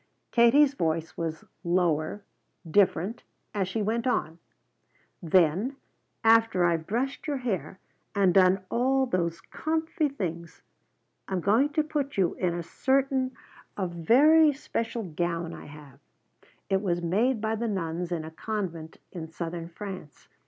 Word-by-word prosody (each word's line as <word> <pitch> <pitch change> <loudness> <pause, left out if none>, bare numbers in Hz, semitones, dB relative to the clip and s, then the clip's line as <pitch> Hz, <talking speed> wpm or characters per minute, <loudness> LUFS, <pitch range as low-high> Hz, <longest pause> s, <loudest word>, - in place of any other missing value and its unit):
Katie's 265 +4 +5
voice 165 - -1
was 160 -1 -4 0.2
lower, 170 +1 0 0.4
different, 195 +4 +2 0.3
as 195 -3 0
she 210 +3 -2
went 230 +4 -1
on: 165 -9 -1 0.8
"Then 180 - +2 0.5
after 225 -5 +4
I've 165 -2 0
brushed 255 +9 -2
your 290 -2 -1
hair 230 -7 -3 0.4
and 195 -3 +4
done 185 0 +4
all 265 +3 +2
those 170 -7 -1
'comfy' 320 -1 -1
things 170 - -6 0.6
I'm 190 -1 -1
going 220 - +3
to 310 0 +2
put 295 -4 -3
you 185 -3 +2
in 175 -2 -1
a 175 - -3
certain, 265 +5 0 0.4
a 195 - 0
very 285 - +5
special 230 -4 -3
gown 170 -1 -3
I - - -10
have. 145 -2 -13 0.7
It 195 -1 +1
was 175 -3 -1
made 220 +8 +1
by 220 +1 -1
the 230 +1 -2
nuns 175 -3 -3
in 165 -2 -2
a 160 - -8
convent 170 -4 -5
in 165 -3 -6
Southern 165 +1 -5
France. 185 -4 -9
190 Hz, 140 wpm, -27 LUFS, 170-240 Hz, 0.8 s, Katie's